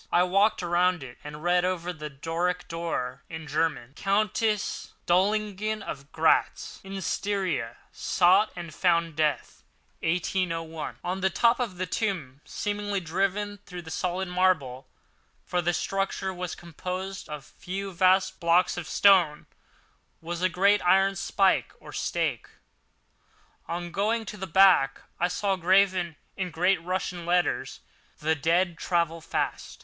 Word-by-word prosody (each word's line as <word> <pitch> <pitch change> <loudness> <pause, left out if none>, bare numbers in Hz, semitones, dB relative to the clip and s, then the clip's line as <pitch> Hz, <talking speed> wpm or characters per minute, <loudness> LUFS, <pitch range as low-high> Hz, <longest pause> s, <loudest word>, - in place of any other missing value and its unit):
I 175 - +5
walked 195 +2 +2
around 175 -1 +2
it, 120 -2 -11
and 150 +1 -8
read, 175 0 +3
over 180 -1 -1
the 150 -2 -7
Doric 165 +5 -2
door, 165 -7 -3
in 160 -1 -7
German: 150 -4 -1
COUNTESS 210 +1 0
DOLINGEN 210 +3 +1
OF 140 0 -7
GRATZ 160 0 +1
IN 195 0 -6
STYRIA 185 - -2
SOUGHT 190 +4 +3
AND 170 -3 -7
FOUND 170 -2 +1
DEATH 155 -1 -1 0.4
1801 165 -2 -2
On 185 +2 -2
the 190 - +3
top 235 +6 +3
of 220 -8 -3
the 185 - -1
tomb, 170 - -3
seemingly 205 -1 -2
driven 195 +4 -1
through 180 -1 -7
the 160 - -9
solid 185 +2 -2
marble—for 180 -1 -2
the 175 +1 +1
structure 195 +2 -2
was 180 -1 -5
composed 185 +3 -6
of 150 -1 -5
a - - -32
few 195 +1 -4
vast 185 +2 +3
blocks 170 +1 +3
of 175 -4 -5
stone—was 170 -1 0
a 185 - +3
great 200 +3 +3
iron 195 +2 +4
spike 195 +1 +1
or - - -12
stake. - - -1 1.2
On 175 0 -4
going 220 +5 0
to 210 - -7
the 190 -1 -5
back 175 -6 +5 0.2
I 175 - +3
saw, 195 +2 0
graven 185 -2 +3 0.2
in 185 -2 -3
great 180 +2 +2
Russian 180 -1 -3
letters: 175 +1 0 0.4
"The 155 +1 +1
dead 165 +3 +1
travel 170 -2 0
fast." - - -3
180 Hz, 135 wpm, -27 LUFS, 165-195 Hz, 1.2 s, I